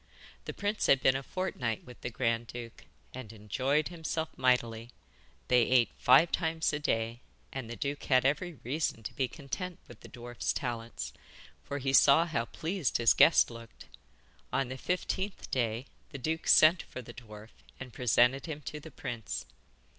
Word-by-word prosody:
The - - -5
prince 205 +1 -1
had 135 - +5
been 130 0 +3
a 135 - -1
fortnight 135 - -3
with 125 -1 -13
the - - -3
grand 115 -1 -1
duke, 120 -1 -9 0.3
and 130 -4 -8
enjoyed 130 +9 0
himself 160 -2 -4
mightily. 120 -3 +1 0.6
They 125 -1 +5
ate 125 -2 +4
five 135 +7 +5
times 160 -2 0
a 150 - -1
day, 115 -3 -1 0.3
and 130 -4 -5
the 120 - -5
duke 140 +6 -4
had 130 -1 +3
every 160 +6 +1
reason 130 -3 -2
to - - -6
be 130 - 0
content 150 +7 -6
with - - -13
the - - -13
dwarf's 120 -1 -4
talents, 120 -3 -4 0.5
for 140 - -4
he 135 -1 -1
saw 140 +4 +7
how 140 -9 -1
pleased 165 +2 -2
his 115 -2 +5
guest - - +6
looked. 115 -1 -12 0.7
On 135 -1 0
the 130 - -5
fifteenth 190 +4 -3
day 120 -1 -1 0.2
the 140 - -7
duke 160 +5 -3
sent 165 +3 +7
for 130 - -9
the - - -11
dwarf 110 -2 -12 0.3
and 125 -2 -9
presented 125 +3 +3
him 150 -2 -5
to 150 +1 -6
the 160 - -11
prince. 120 -5 -5
130 Hz, 170 wpm, -31 LUFS, 120-155 Hz, 0.7 s, saw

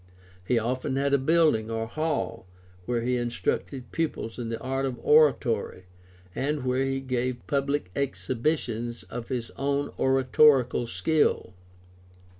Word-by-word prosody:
He 120 +6 +1
often 130 +4 -1
had 140 +1 +1
a 140 - +4
building 150 -6 +3
or 115 0 -2
hall 115 - -3 0.4
where 120 -1 0
he 125 +1 +1
instructed 120 +2 -3
pupils 155 -8 -3
in 115 -2 -4
the 115 0 -3
art 135 +2 -2
of 125 -2 -4
oratory 135 -11 +3 0.5
and 145 -1 -2
where 130 +1 +1
he 135 0 -1
gave 125 -1 -2
public 140 -8 -1
exhibitions 120 - -2
of 120 -1 -7
his 120 -3 -4
own 140 +1 -1
oratorical 130 -1 +4
skill. 95 - +1
130 Hz, 130 wpm, -27 LUFS, 115-140 Hz, 0.5 s, a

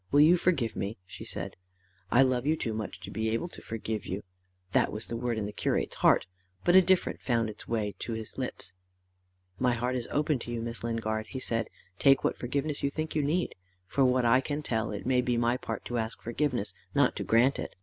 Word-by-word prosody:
Will 145 - +6
you 160 +4 +8
forgive 165 -10 +1
me?" 100 +3 -3
she 90 - -9
said. - - -6 0.6
"I 130 - +7
love 130 0 +1
you 155 - +4
too 115 - -2
much 110 -1 -4
to - - -7
be 110 0 -1
able 115 +10 -1
to - - -11
forgive 110 -2 -4
you:" 95 +3 -3 0.5
that - - +3
was 105 +1 -4
the 115 - -4
word 120 -1 -1
in 105 - -1
the 105 - -5
curate's - - 0
heart, - - +5 0.4
but 175 - +4
a 190 - +10
different 185 0 +2
found 115 -3 +1
its - - -12
way 105 -3 -1
to 115 - -3
his 110 -1 -6
lips. 110 -8 -3 0.9
"My 125 -1 +3
heart 125 +2 -1
is 120 -2 -2
open 150 -2 +1
to 120 - -6
you, 120 - -2
Miss 115 0 -5
Lingard," 110 -2 -1
he 130 - -5
said: 115 -3 -1 0.3
"take 135 -1 +5
what - - +1
forgiveness 140 +4 -2
you 140 - +2
think 155 +2 -3
you 155 - +2
need. 160 +5 0 0.3
For 135 +9 +1
what 125 -1 +3
I 125 +3 +5
can 145 +2 -3
tell, 110 -5 -1
it 100 -1 -5
may 125 0 +3
be 125 -1 0
my 120 +1 +2
part - - -5
to 120 -1 -1
ask 110 0 -3
forgiveness, 120 -5 -1 0.2
not - - +4
to - - -2
grant 125 +5 +4
it. - - -5
120 Hz, 230 wpm, -29 LUFS, 110-140 Hz, 0.9 s, a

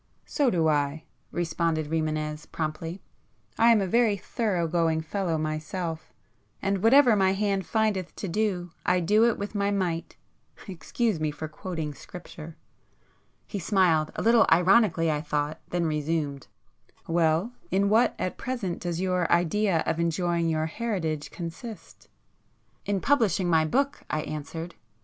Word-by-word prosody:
"So 285 -3 +1
do 165 -7 +2
I!" 145 0 0 0.3
responded 165 -2 -1
Rimânez 155 -1 -2
promptly. 165 +3 -4 0.6
"I 230 - +6
am 225 -3 +5
a - - 0
very 220 +1 +2
thorough 190 -4 -1
going 165 -1 +1
fellow 170 0 -2
myself, 155 +2 -4 0.5
and 195 -1 -1
whatever 245 +1 +6
my 190 -1 +3
hand 195 -2 -1
findeth 215 -5 0
to 200 - -5
do, 180 -2 -1
I 180 0 +2
do 210 +6 +4
it 235 - +2
with 205 +1 -5
my 200 -1 0
might!—excuse 190 +2 -3
me 155 -1 0
for 150 +1 -5
quoting 155 -1 -5
Scripture!" 165 -1 -11 0.9
He 205 - -5
smiled, 170 -4 +2
a - - -3
little 230 0 +5
ironically 180 -3 +4
I 150 -1 -1
thought, 150 0 -2
then 175 -1 0
[p 155 -1 0
61] 160 +1 0
resumed—"Well, 160 - -3 0.2
in 195 +2 +2
what, 220 +4 +3
at 185 - -3
present 240 -9 -3
does 175 -1 -3
your 180 -2 0
idea 175 +1 +2
of 160 0 -1
enjoying 170 0 0
your 155 -1 0
heritage 160 -6 -3
consist?" 180 +7 -9 0.8
"In 200 -2 0
publishing 205 - +2
my 160 -1 +4
book," 275 - 0
I 155 - -1
answered. 160 +3 -6
175 Hz, 145 wpm, -27 LUFS, 160-200 Hz, 0.9 s, I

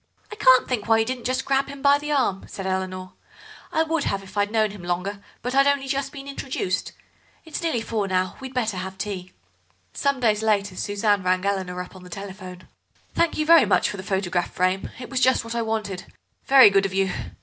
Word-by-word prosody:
"I - - -6
can't 260 -11 +5
think 230 -5 -2
why 225 0 +5
you 225 - +2
didn't 255 +1 -2
grab 270 0 +1
him 280 -1 -9
by 285 0 +5
the 295 +1 -4
arm," 255 -9 +1
said 195 - -7
Eleanor; 185 -1 -3 0.6
"I 320 - +2
would 320 -1 -1
have 195 0 -1
if 190 -1 -14
I'd 205 0 +1
known 215 -1 +1
him 205 -2 -10
longer, 180 +3 -3 0.2
but 250 +1 -2
I'd 275 +1 +5
only 280 -1 +1
just 275 0 -2
been 275 -1 -9
introduced. 260 -9 -3 0.5
It's 320 - -5
nearly 320 -9 0
four 220 -3 -2
now, 185 -1 0
we'd 265 -1 -7
better 225 -6 0
have 190 +1 -5
tea." 190 -3 -5 0.6
Some 280 -1 0
days 215 -3 +2
later 205 -3 +1
Suzanne 205 +1 +1
rang 185 +1 +1
Eleanor 190 -2 -1
up 180 - -15
on 185 - -11
the 180 - -12
telephone. 185 -1 -9 0.5
"Thank 335 -1 +1
you 305 - 0
very 330 -1 +7
much - - +2
for 205 - -7
the - - -5
photograph 190 -2 -1
frame. 185 +1 0
It 250 - -8
was 260 - 0
just 260 -1 +3
what 230 0 -6
I 235 - -1
wanted. 215 -4 -3 0.4
Very 265 -6 +8
good 195 0 +3
of 190 - -8
you. 195 -1 +2
210 Hz, 215 wpm, -24 LUFS, 190-265 Hz, 0.6 s, Very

